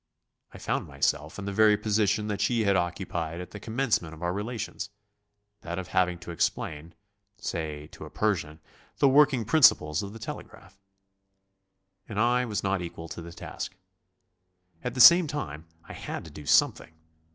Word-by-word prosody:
I -, -, -11 dB
found -, -, -2 dB
myself 75 Hz, +2 st, -1 dB
in 100 Hz, -, -6 dB
the 100 Hz, -, -3 dB
very 105 Hz, 0 st, +5 dB
position 105 Hz, 0 st, +1 dB
that 105 Hz, -1 st, -3 dB
she 115 Hz, +1 st, +2 dB
had 100 Hz, -1 st, +3 dB
occupied 85 Hz, -2 st, -2 dB
at 90 Hz, -, -8 dB
the 105 Hz, -, -8 dB
commencement 110 Hz, -8 st, -1 dB
of 80 Hz, -, -11 dB
our 90 Hz, 0 st, 0 dB
relations: 110 Hz, +1 st, -4 dB, 0.7 s
that 85 Hz, 0 st, -5 dB
of 95 Hz, -2 st, -5 dB
having 90 Hz, -1 st, +1 dB
to 85 Hz, -, -7 dB
explain 80 Hz, -1 st, -2 dB, 0.4 s
say, 80 Hz, -7 st, -4 dB
to -, -, -10 dB
a -, -, -10 dB
Persian 85 Hz, -7 st, -1 dB, 0.4 s
the 140 Hz, -, +4 dB
working 135 Hz, -3 st, +4 dB
principles 95 Hz, -, +5 dB
of 100 Hz, -1 st, -6 dB
the -, -, -8 dB
telegraph. 110 Hz, -2 st, -9 dB, 1.3 s
And 105 Hz, -1 st, -3 dB
I 120 Hz, +2 st, +3 dB
was 105 Hz, -4 st, -3 dB
not 100 Hz, -1 st, 0 dB
equal 85 Hz, -1 st, -7 dB
to 85 Hz, -, -7 dB
the 85 Hz, 0 st, -9 dB
task. 95 Hz, +2 st, -7 dB, 1.1 s
At 125 Hz, 0 st, -3 dB
the 125 Hz, -, +3 dB
same 170 Hz, +6 st, +9 dB
time 85 Hz, -, -5 dB, 0.2 s
I -, -, -8 dB
had -, -, -6 dB
to 80 Hz, -, -11 dB
do 75 Hz, -1 st, -11 dB
something. 80 Hz, -, +3 dB
100 Hz, 170 wpm, -27 LUFS, 85-110 Hz, 1.3 s, same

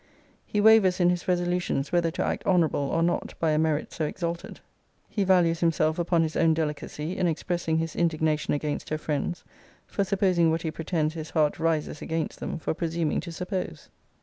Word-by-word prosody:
He 210 Hz, -, -1 dB
wavers 205 Hz, -4 st, +6 dB
in 175 Hz, 0 st, +4 dB
his 180 Hz, +2 st, -3 dB
resolutions 175 Hz, -5 st, 0 dB
whether 175 Hz, -1 st, +2 dB
to 165 Hz, -, -2 dB
act -, -, -2 dB
honourable 160 Hz, -7 st, +2 dB
or 165 Hz, -, +1 dB
not 175 Hz, +1 st, -1 dB
by 160 Hz, -1 st, +2 dB
a 155 Hz, -, +2 dB
merit 155 Hz, -2 st, 0 dB
so 155 Hz, -, -1 dB
exalted. 170 Hz, +2 st, -4 dB, 0.5 s
He 205 Hz, -, -1 dB
values 175 Hz, -3 st, +3 dB
himself 160 Hz, -1 st, +1 dB
upon 170 Hz, -1 st, +2 dB
his 160 Hz, -1 st, -3 dB
own 160 Hz, -1 st, +3 dB
delicacy, 155 Hz, +1 st, -3 dB
in 180 Hz, -, +1 dB
expressing 165 Hz, 0 st, -1 dB
his 165 Hz, 0 st, -2 dB
indignation 155 Hz, -3 st, +1 dB
against 145 Hz, 0 st, -3 dB
her 155 Hz, -, -1 dB
friends, 155 Hz, +2 st, -3 dB, 0.4 s
for 200 Hz, -, -1 dB
supposing 185 Hz, -4 st, +2 dB
what 160 Hz, 0 st, 0 dB
he 160 Hz, -, -2 dB
pretends 160 Hz, -1 st, -1 dB
his 160 Hz, -1 st, -6 dB
heart 155 Hz, -2 st, +1 dB
rises 160 Hz, -2 st, -1 dB
against 160 Hz, 0 st, -3 dB
them -, -, -4 dB
for 160 Hz, -, -2 dB
presuming 165 Hz, -1 st, -1 dB
to 170 Hz, -, -6 dB
suppose. 180 Hz, +2 st, -5 dB
165 Hz, 185 wpm, -27 LUFS, 155-175 Hz, 0.5 s, wavers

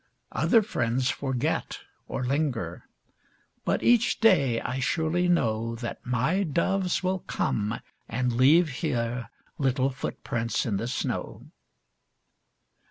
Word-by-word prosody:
Other 225 Hz, -3 st, +3 dB
friends 125 Hz, -, 0 dB
forget, 135 Hz, +2 st, -2 dB, 0.3 s
or 130 Hz, -, -3 dB
linger, 125 Hz, -, -2 dB, 0.8 s
But -, -, 0 dB
each 240 Hz, -1 st, +4 dB
day 145 Hz, -, +4 dB
I 130 Hz, +3 st, -3 dB
surely 160 Hz, +5 st, +1 dB
know 115 Hz, -9 st, +1 dB
That 120 Hz, 0 st, -6 dB
my 130 Hz, -, +1 dB
doves 185 Hz, +3 st, 0 dB
will 185 Hz, +1 st, 0 dB
come 110 Hz, -, -1 dB, 0.3 s
and 125 Hz, +1 st, 0 dB
leave 150 Hz, +8 st, +5 dB
here 120 Hz, -, -1 dB, 0.3 s
Little 135 Hz, -1 st, +1 dB
footprints 115 Hz, -2 st, -2 dB
in 105 Hz, -4 st, 0 dB
the 115 Hz, -, -3 dB
snow. 125 Hz, -, -4 dB
130 Hz, 110 wpm, -27 LUFS, 120-170 Hz, 0.8 s, leave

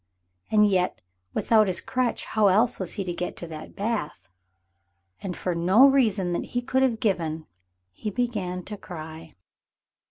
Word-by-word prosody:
And 210 Hz, -1 st, +5 dB
yet 185 Hz, -3 st, +1 dB, 0.4 s
without 215 Hz, -2 st, +4 dB
his 180 Hz, -1 st, +2 dB
crutch, 255 Hz, -2 st, -1 dB
how 215 Hz, -2 st, +2 dB
else 220 Hz, +6 st, +3 dB
was 185 Hz, -3 st, -2 dB
he 200 Hz, -, -2 dB
to 180 Hz, -2 st, -3 dB
get 180 Hz, +1 st, -4 dB
to -, -, -5 dB
that 155 Hz, -2 st, -9 dB
bath? 200 Hz, -, -3 dB, 0.9 s
And 185 Hz, -3 st, -5 dB
for 180 Hz, -, -2 dB
no 185 Hz, +10 st, +6 dB
reason 215 Hz, -10 st, +2 dB
that 170 Hz, -, -1 dB
he -, -, +2 dB
could 260 Hz, +1 st, +1 dB
have 245 Hz, -4 st, +2 dB
given 165 Hz, -8 st, -1 dB, 0.5 s
he 210 Hz, -, -5 dB
began 200 Hz, -6 st, -2 dB
to 210 Hz, +2 st, -7 dB
cry. 160 Hz, -2 st, -9 dB
190 Hz, 160 wpm, -25 LUFS, 175-225 Hz, 0.9 s, no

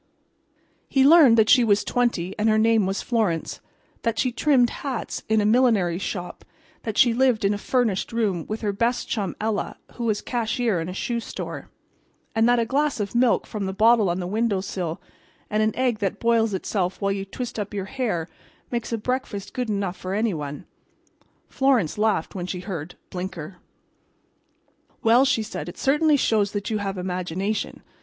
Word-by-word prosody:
He 270 Hz, -2 st, +3 dB
learned 285 Hz, -6 st, +7 dB
that 220 Hz, -1 st, +5 dB
she 245 Hz, -, +6 dB
was 205 Hz, -2 st, +3 dB
twenty, 230 Hz, -7 st, 0 dB
and 215 Hz, +1 st, +3 dB
her 215 Hz, -, +3 dB
name 220 Hz, -2 st, +3 dB
was 195 Hz, +1 st, -2 dB
Florence; 210 Hz, -10 st, -1 dB, 0.4 s
that 230 Hz, -1 st, -1 dB
she 255 Hz, +2 st, +1 dB
trimmed 245 Hz, -1 st, +3 dB
hats 270 Hz, -4 st, -4 dB
in 220 Hz, -1 st, +3 dB
a -, -, +1 dB
millinery 215 Hz, -7 st, +3 dB
shop; 180 Hz, -2 st, -5 dB, 0.4 s
that 220 Hz, -2 st, -4 dB
she 240 Hz, -2 st, +5 dB
lived 245 Hz, -4 st, +2 dB
in 200 Hz, -, +3 dB
a -, -, -2 dB
furnished 230 Hz, -5 st, 0 dB
room 210 Hz, -7 st, -1 dB
with 215 Hz, +1 st, -4 dB
her 205 Hz, -2 st, -1 dB
best 235 Hz, +4 st, 0 dB
chum 200 Hz, -5 st, -2 dB
Ella, 215 Hz, -1 st, -2 dB, 0.2 s
who 240 Hz, -, -4 dB
was 215 Hz, -2 st, +1 dB
cashier 230 Hz, -5 st, 0 dB
in 165 Hz, -, -4 dB
a -, -, -5 dB
shoe 235 Hz, +3 st, -2 dB
store; -, -, -7 dB, 0.6 s
and 225 Hz, +1 st, +3 dB
that 245 Hz, -, +4 dB
a 230 Hz, -, +2 dB
glass 285 Hz, +2 st, 0 dB
of 200 Hz, -2 st, -3 dB
milk 240 Hz, 0 st, +3 dB
from 205 Hz, -3 st, -4 dB
the 190 Hz, -, -3 dB
bottle 220 Hz, -2 st, +4 dB
on 175 Hz, +1 st, -1 dB
the 180 Hz, -, -3 dB
window 210 Hz, +1 st, 0 dB
sill 180 Hz, -4 st, -4 dB, 0.5 s
and 215 Hz, +1 st, +2 dB
an 215 Hz, 0 st, +2 dB
egg 250 Hz, -4 st, 0 dB
that 205 Hz, 0 st, -2 dB
boils 225 Hz, -3 st, +2 dB
itself 185 Hz, -1 st, -2 dB
while 200 Hz, -1 st, 0 dB
you 195 Hz, 0 st, -2 dB
twist 230 Hz, +4 st, -6 dB
up 205 Hz, -1 st, -4 dB
your 200 Hz, -2 st, -3 dB
hair 210 Hz, -9 st, -2 dB, 0.4 s
makes 240 Hz, -1 st, -3 dB
a 230 Hz, -, 0 dB
breakfast 225 Hz, -3 st, -3 dB
good 250 Hz, -3 st, -2 dB
enough 200 Hz, -3 st, -1 dB
for 185 Hz, +1 st, -4 dB
any 215 Hz, -1 st, +1 dB
one. 145 Hz, -2 st, -6 dB, 0.8 s
Florence 250 Hz, -, +1 dB
laughed 210 Hz, -6 st, +1 dB
when 180 Hz, -2 st, -4 dB
she 180 Hz, -1 st, -4 dB
heard 180 Hz, -3 st, -6 dB, 0.2 s
"Blinker." 180 Hz, -1 st, -6 dB, 1.5 s
"Well," 235 Hz, +4 st, +5 dB
she 230 Hz, -4 st, +1 dB
said. 215 Hz, -, -6 dB
"It -, -, -11 dB
certainly 300 Hz, +2 st, +3 dB
shows 210 Hz, -6 st, +1 dB
that 205 Hz, +2 st, -3 dB
you 215 Hz, -, 0 dB
have 195 Hz, -1 st, -3 dB
imagination. 185 Hz, +3 st, -3 dB
215 Hz, 185 wpm, -24 LUFS, 195-235 Hz, 1.5 s, learned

